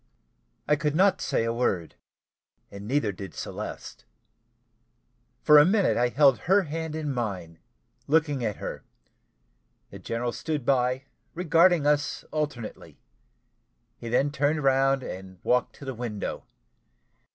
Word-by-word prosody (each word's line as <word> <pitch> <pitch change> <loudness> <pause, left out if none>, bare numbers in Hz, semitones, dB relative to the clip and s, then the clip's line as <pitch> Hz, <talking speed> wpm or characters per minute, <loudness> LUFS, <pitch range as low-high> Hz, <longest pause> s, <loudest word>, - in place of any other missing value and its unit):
I 150 - +4
could 150 0 -1
not 190 +2 +3
say - - 0
a 115 0 -1
word 95 -9 -1 0.8
neither 105 +3 -1
did 95 0 -9
Celeste. - - -7 1.4
For 150 -1 +8
a - - +8
minute 195 +4 +2
I 120 +1 +2
held 135 0 +4
her 200 +1 +5
hand 160 0 -5
in 150 -3 -3
mine, 95 -9 -4 0.5
looking 150 -3 +1
at 105 -3 -1
her; - - -7 1.1
the - - -10
general 120 +1 -3
stood 150 0 -4
by, 130 0 +1 0.3
regarding 170 -1 +3
us 145 0 +1
alternately. 145 -7 -5 1.0
He 115 - -8
then 135 +5 +2
turned 150 +1 0
round 135 0 +3
and 95 -2 -8
walked 125 0 +1
to 140 - -11
the 135 - -4
window. 115 -4 -5
135 Hz, 130 wpm, -26 LUFS, 115-150 Hz, 1.4 s, For